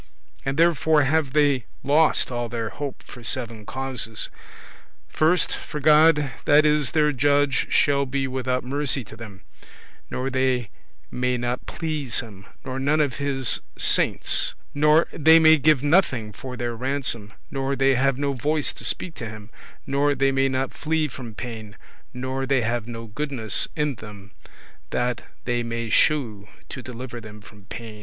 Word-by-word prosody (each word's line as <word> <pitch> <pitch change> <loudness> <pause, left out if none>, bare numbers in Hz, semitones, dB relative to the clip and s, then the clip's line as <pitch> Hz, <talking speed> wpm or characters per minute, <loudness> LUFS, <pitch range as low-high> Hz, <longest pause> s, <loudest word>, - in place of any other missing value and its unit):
And 135 +1 -2
therefore 160 -2 +4
have 140 0 +1
they 145 -5 +2 0.2
lost 150 0 +3
all 120 -1 -3
their 115 -1 -3
hope 140 +1 -6
for 120 - -12
seven 115 -3 -4
causes. 130 -5 -3 0.8
First, 165 +3 +2
for 150 - -7
God 150 -1 +5
that 150 +1 +5
is 150 -2 +2
their 150 -1 +3
judge 145 +1 +2
shall 140 -1 +2
be 135 +1 -1
without 130 -1 -2
mercy 140 0 -1
to 110 - -13
them; 105 -4 -11 0.7
nor 130 +1 -3
they 130 -4 0 0.4
may 125 0 0
not 120 +1 -3
please 150 -7 -2
him; 105 -5 -9 0.2
nor 130 0 -4
none 145 +3 +1
of 145 -3 0
his 135 -3 +1
hallows - - -15 0.2
[saints]; - - +3 0.2
nor 150 +3 +4
they 160 +1 +6
may 160 -1 +7
give 150 -2 +3
nothing 135 - +2
for 125 +2 -8
their 120 -1 -3
ransom; 125 -5 -3 0.2
nor 135 0 -1
they 135 0 +3
have 135 +1 +1
no 140 0 -1
voice 150 +3 0
to - - -9
speak 175 - -1
to 115 -7 -6
him; 105 +1 -11 0.3
nor 140 +1 +1
they 135 0 +2
may 135 0 +2
not 130 0 -2
flee 160 0 -1
from 120 -5 -9
pain; 110 -4 -7 0.3
nor 130 +1 -4
they 135 -2 +2
have 115 0 -2
no 115 -1 -7
goodness 115 -4 -1
in 150 -2 0
them 105 -4 -12 0.6
that 120 0 -1 0.2
they 120 -1 0
may 115 -1 -4
shew 115 -10 +2 0.2
to 130 - -7
deliver 125 -1 -8
them 105 -1 -11
from 105 -1 -16
pain. 110 0 -9
130 Hz, 165 wpm, -24 LUFS, 120-145 Hz, 0.8 s, may